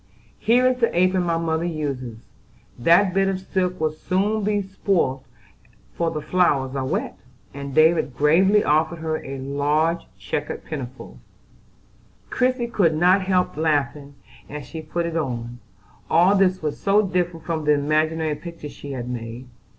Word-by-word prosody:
"Here 245 +3 +3
is 255 0 +2
the 230 - +3
apron 185 +1 +3
my 170 -2 0
mother 165 0 -1
uses, 140 -8 -4 0.6
that 175 +8 +4
bit 195 0 +2
of 190 -1 -1
silk 185 -1 -2
will 155 -1 +1
soon 200 +7 -1
be 205 0 0
spoilt, 185 -9 -1 0.7
for 170 -1 0
the 155 -2 -5
flowers 145 -6 +1
are 135 - -1
wet," - - -3 0.3
and 140 0 -7
David 155 -5 +3
gravely 190 +8 +4
offered 160 +3 +1
her 160 -1 -3
a 135 0 -6
large 145 +5 0 0.2
checked 100 +10 -4
pinafore. 130 - -7 1.1
Christie 255 -1 +1
could 185 -9 +1
not 180 +4 +4
help 185 -1 +1
laughing 145 -2 -1 0.3
as 145 -1 -7
she 160 +5 -7
put 170 +2 -3
it 170 -1 -4
on: 120 -6 -3 0.5
all 175 +4 +5
this 185 -3 +2
was 150 -2 -3
so 205 +2 +3
different 175 -3 -2
from 160 -2 -2
the 150 - +5
imaginary 155 +2 +1
picture 160 0 -8
she 140 -1 -8
had 120 -2 -5
made. 120 +1 -6
160 Hz, 155 wpm, -23 LUFS, 145-185 Hz, 1.1 s, all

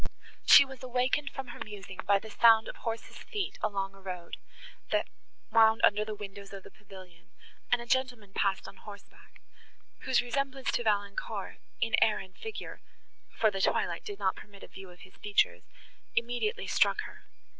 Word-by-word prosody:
She 280 - +10
was 270 -2 -11
awakened 255 +3 0
from 265 -2 -7
her - - -9
musing 195 -3 -10
by 200 0 +5
the 215 +2 -9
sound 225 -1 +6
of - - -7
horses' 230 -1 -5
feet 410 -3 -4
along 195 -1 -1
a 195 - -16
road, 180 -3 -6 0.5
that - - +1 0.4
wound 225 0 +6
under 210 +1 +5
the 215 0 -5
windows 200 -1 -9
of 195 -1 -8
the - - -13
pavilion, 185 -4 -15 0.4
and 245 -1 +3
a - - -12
gentleman 245 -5 -1
passed 195 -1 0
on 195 - -12
horseback, 205 -1 -14 0.6
whose 260 -2 +2
resemblance 270 +1 -2
to - - 0
Valancourt, 205 -3 -2 0.2
in 225 - 0
air 215 -1 +4
and 190 -1 -9
figure, 445 -1 -7 0.6
for 220 -2 +4
the 195 -1 -3
twilight 170 -3 +1
did 205 - -6
not 195 -2 0
permit 200 -1 -13
a - - -9
view 195 -1 -11
of 180 0 -16
his 190 - -15
features, 90 - +1 0.5
immediately 245 - -1
struck - - +3
her. - - -11
210 Hz, 175 wpm, -30 LUFS, 195-240 Hz, 0.6 s, She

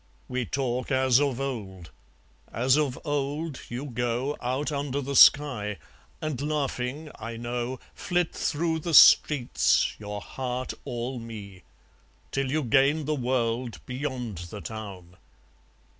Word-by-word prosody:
We 125 -1 -2
talk 125 -2 -2
as 130 -2 +4
of 135 -4 0
old; 100 -11 -5 0.6
as 130 +3 +3
of 145 -4 0
old 145 +1 -2
you 125 +4 -4
go 120 +2 -1
Out 130 +5 -1
under 140 -1 -2
the 140 0 -4
sky, 125 -11 +5 0.4
and 150 -4 -3
laughing, 145 0 -2
I 115 +1 -6
know, 120 +2 -3
Flit 175 -2 -1
through 160 +1 -1
the 160 0 0
streets, 140 -4 +6
your 105 -1 -5
heart 125 +2 -4
all 120 +1 -4
me; 105 -5 -9 0.7
Till 135 -1 -1
you 155 +3 0
gain 140 +5 +3
the 155 - 0
world 125 -3 -1
beyond 125 - -4
the 105 - -7
town. 95 -5 -8
130 Hz, 130 wpm, -27 LUFS, 120-145 Hz, 0.7 s, streets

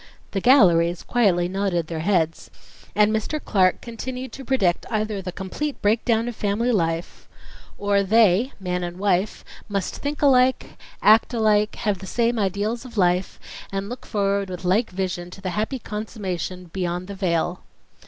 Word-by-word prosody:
The 195 - -2
galleries 175 - +5
quietly 190 -8 +2
nodded 185 -3 -1
their 160 0 -5
heads, 165 -2 0 0.5
and 210 +1 +4
Mr. 220 +8 -2
Clark 185 -9 +2
continued 250 +2 -6
to 270 - -9
predict 215 -10 +1
either 215 -2 -1
the 180 -1 -5
complete 195 +11 -4
breakdown 225 +2 +1
of 240 - -4
family 215 +5 0
life.... 165 -5 -2 0.5
or 200 0 +2
"they 220 +3 +4
[man 180 -1 -2
and 175 0 -5
wife] 195 0 0 0.2
must 200 -2 -2
think 290 +1 -4
alike, 260 -2 +3 0.3
act 220 +3 +5
alike, 210 -2 +2
have 210 -4 -1
the 190 - -9
same 235 +1 +1
ideals 205 +4 -1
of 245 -3 -11
life, 180 0 +1 0.3
and 195 +1 -3
look 245 +1 -8
forward 200 -2 0
with 180 0 -6
like 210 +6 +2
vision 180 -2 -3
to 185 - -11
the 190 -1 -4
happy 215 +7 -2
consummation 195 -5 -5
'beyond 180 -1 -2
the 200 - -7
vale.'. 180 -2 -1
200 Hz, 160 wpm, -23 LUFS, 180-225 Hz, 0.5 s, galleries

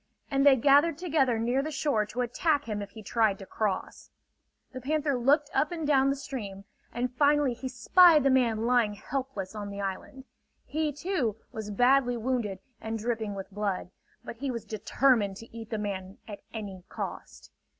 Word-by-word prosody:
and 275 0 +2
they 280 -1 +7
gathered 285 +5 +4
together 295 -9 +1
near 240 +4 +1
the 305 - -4
shore 275 -8 0
to 245 +4 -3
attack 290 +4 0
him 210 -2 -3
if 200 - -6
he 215 +1 -11
tried 215 -2 +1
to 195 - -10
cross. 205 -1 -3 0.6
The 255 - -7
panther 295 +2 0
looked 285 +4 +2
up 300 - +1
and 330 -3 -3
down 275 -2 +4
the 275 - +1
stream, 210 -8 -7 0.3
and 245 +1 -2
finally 290 -1 +3
he 260 +2 -6
spied 315 +5 +6
the 275 - +4
man 230 -4 +2
lying 235 -4 +2
helpless 245 -5 -4
on 205 -1 -5
the 200 0 -7
island. 200 +7 -5 0.4
He, 305 +3 -1
too, 290 - -1 0.2
was 215 -1 -6
badly 245 +3 +3
wounded 230 -5 -1 0.2
and 225 0 -3
dripping 220 -2 -2
with 195 0 -7
blood; 200 -3 -2 0.3
but 230 - -7
he 275 +3 -3
was 235 -3 -4
determined 220 -2 +1
to 225 +1 -13
eat 225 -1 -8
the 220 - -2
man 195 -2 -5
at 205 -2 -8
any 200 -5 -7
cost. - - -7
245 Hz, 180 wpm, -28 LUFS, 210-275 Hz, 0.6 s, they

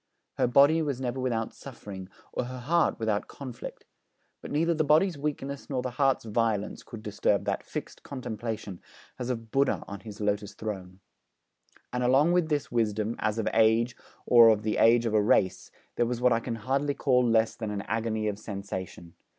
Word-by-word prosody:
Her - - +4
body 140 +6 +5
was 140 -5 -2
never 130 0 -3
without 115 -3 -1
suffering, 100 -8 -9 0.2
or - - -1
her 130 +1 -6
heart 165 +8 +1
without 110 -2 -1
conflict; 130 -4 -9 0.6
but - - -8
neither 165 +3 +2
the 155 -1 +1
body's 155 +5 +3
weakness 140 -1 -4
nor 130 -3 -1
the 125 - -3
heart's 135 -1 +1
violence 110 -2 -1
could 110 -2 -10
disturb 105 - 0
that - - -1
fixed - - -7
contemplation, 110 -7 -5 0.4
as 125 0 -3
of 115 -3 -4
Buddha 135 0 +1
on 100 0 -7
his 105 -1 -10
lotus 105 -1 -1
throne. 95 -3 -6 0.9
And 125 - -1
along 135 +7 +4
with 175 -2 +2
this 150 -2 -1
wisdom, 110 -1 0
as 105 +1 0
of 110 - -1
age 115 +2 +3 0.3
or 120 -2 +8
of 110 -1 +2
the 110 0 0
age 115 +1 +5
of 115 - -1
a 105 - +4
race, 95 -2 +2 0.3
there 120 - +2
was 120 0 -2
what 125 -1 +4
I 115 - +2
can 115 0 -4
hardly 135 +5 -1
call 125 -2 +3
less 115 -2 +2
than 110 -2 -4
an 100 -1 -3
agony 110 -1 -1
of 105 -1 -3
sensation. 95 -5 -6
115 Hz, 185 wpm, -28 LUFS, 105-130 Hz, 0.9 s, or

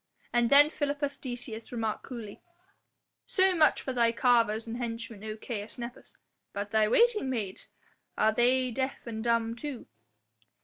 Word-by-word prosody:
And 240 -1 +3
then 290 +2 +7
Philippus 285 -2 -2
Decius 240 -3 -6
remarked 225 -3 -2
coolly: 230 -5 -8 0.9
"So 380 -1 +3
much 315 -3 +3
for 260 - -3
thy 235 -2 +3
carvers 230 -2 +2
and 230 +1 -5
henchmen, 230 -3 -5
O 215 0 -5
Caius 215 -1 -6
Nepos, 240 0 -8 0.4
but 205 +1 -4
thy 220 -1 +3
waiting 430 - +3
maids? 215 -7 -4 0.5
are 220 - +4
they 250 +2 +2
deaf 260 +3 -3
and 220 -2 -5
dumb 230 -1 +1
too?" 270 0 -6
235 Hz, 145 wpm, -29 LUFS, 220-260 Hz, 0.9 s, then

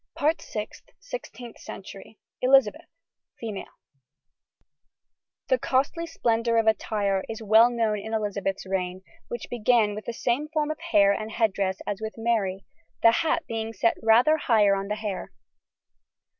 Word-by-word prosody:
SIXTEENTH 370 - -9
CENTURY. 195 +2 -10 0.2
ELIZABETH. 255 -4 +3 0.5
FEMALE. 215 -4 -5 1.8
The - - +2
costly 280 +6 0
splendour 230 -6 0
of 225 - +3
attire 205 -3 +1
is 225 0 -6
well 220 +3 +6
known 225 -3 0
in 220 +2 -7
Elizabeth's 200 -3 -2
reign, 185 -1 -3 0.2
which 240 - -5
began 230 -2 +2
with 210 +1 -7
the - - -3
same 250 +6 -1
form 305 -1 -1
of 310 - -6
hair 205 -13 +4
and 215 +2 -3
head 220 -3 +1
dress 190 -1 -2
as 205 +1 -4
with 220 0 -5
Mary, 210 -5 -1 0.4
the 230 - +8
hat 325 +7 0
being 225 0 -4
set 225 +2 +2
rather 240 +8 +5
higher 215 -8 +3
on 195 0 -3
the 210 - -2
hair. 210 -3 -5
220 Hz, 140 wpm, -26 LUFS, 200-240 Hz, 1.8 s, the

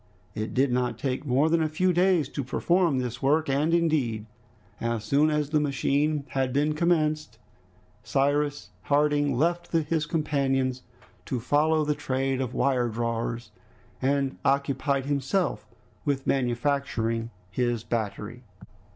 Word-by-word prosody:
It 110 0 -4
did 130 0 +3
not 125 -2 0
take 130 +3 -3
more 135 +4 +3
than 165 0 +2
a 155 - +1
few 180 +4 +1
days 175 -4 +3
to 140 - -4
perform 170 +3 +1
this 125 -1 -3
work, 150 +4 +2
and 145 +4 +1
indeed 150 -11 +1 0.5
as 115 -2 -2
soon 140 +7 +3
as 150 -1 -1
the 155 - +3
machine 145 +1 0
had 130 -1 -1
been 145 +3 +1
commenced, 155 -2 0 0.6
Cyrus 145 +1 0
Harding 145 -2 +2
left 175 +4 0
his 160 -1 +1
companions 135 -5 0 0.5
to 125 - -1
follow 150 +5 +2
the 150 - +1
trade 135 -1 -1
of 130 - -3
wiredrawers, 120 -2 -1 0.5
and 135 0 0
occupied 140 0 +1
himself 140 - -1 0.4
with 140 -2 -1
manufacturing 120 -3 0 0.2
his 120 -2 -1
battery. 115 +1 -4
140 Hz, 130 wpm, -26 LUFS, 125-150 Hz, 0.6 s, did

